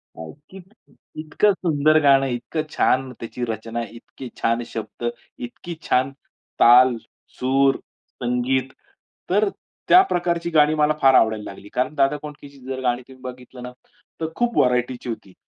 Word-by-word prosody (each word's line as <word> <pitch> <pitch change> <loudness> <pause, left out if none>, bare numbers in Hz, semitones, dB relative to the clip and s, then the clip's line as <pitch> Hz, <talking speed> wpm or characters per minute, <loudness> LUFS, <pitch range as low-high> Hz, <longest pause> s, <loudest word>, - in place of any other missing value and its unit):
काय, 80 -1 -8 0.2
की 190 - -11 0.6
इतकं 195 +6 +2
सुंदर 155 -4 +2
गाणं, 135 -1 +5
इतकं 125 +5 -3
छान 130 0 +2
त्याची 120 +2 -6
रचना, 115 +1 -4
इतके 120 +2 -11
छान 115 +1 +1
शब्द, 115 +1 -7 0.4
इतकी 170 +8 -9
छान 130 +2 +1 0.5
ताल, 125 +1 +7 0.4
सूर, 135 +1 +3 0.5
संगीत. 125 +2 0 0.6
तर 205 +2 +2 0.4
त्या 370 - +8
प्रकारची 170 -1 -1
गाणी 155 -1 +4
मला 150 0 +2
फार 135 -1 +6
आवडायला 110 -1 +3
लागली, 100 +1 -13
कारण 130 +4 -1
दादा 140 +1 +2
कोंडकेची 145 -2 -11
जर 130 0 -4
गाणी 125 0 0
तुम्ही 130 -1 -16
बघितलं 125 0 -10
ना, 125 - -7 0.5
तर 160 - 0
खूप 240 -1 -1
व्हरायटीची 125 0 +1
होती. 100 -4 -7
130 Hz, 145 wpm, -22 LUFS, 120-150 Hz, 0.6 s, त्या